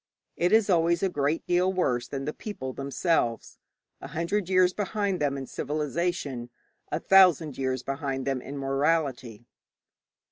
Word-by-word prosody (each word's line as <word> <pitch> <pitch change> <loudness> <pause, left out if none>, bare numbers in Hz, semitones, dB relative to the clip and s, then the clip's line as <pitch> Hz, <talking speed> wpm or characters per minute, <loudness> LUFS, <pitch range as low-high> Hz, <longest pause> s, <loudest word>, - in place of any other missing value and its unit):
It 175 +1 +1
is 220 -1 +5
always 170 -2 +2
a 195 - +2
great 150 -1 -1
deal 180 +1 +2
worse 125 -10 0
than 135 0 -5
the 150 - -3
people 130 -12 -6
themselves 135 -3 -1 0.4
a - - -7
hundred 175 +3 -2
years 185 -1 +4
behind 205 -2 -1
them 140 -2 0
in 135 - -5
civilization, 150 -3 -3 0.4
a - - 0
thousand 175 -7 +5
years 130 -1 -2
behind 135 -1 -3
them 135 -2 -1
in 140 +3 -7
morality. 135 -5 -1
150 Hz, 145 wpm, -27 LUFS, 135-180 Hz, 0.4 s, is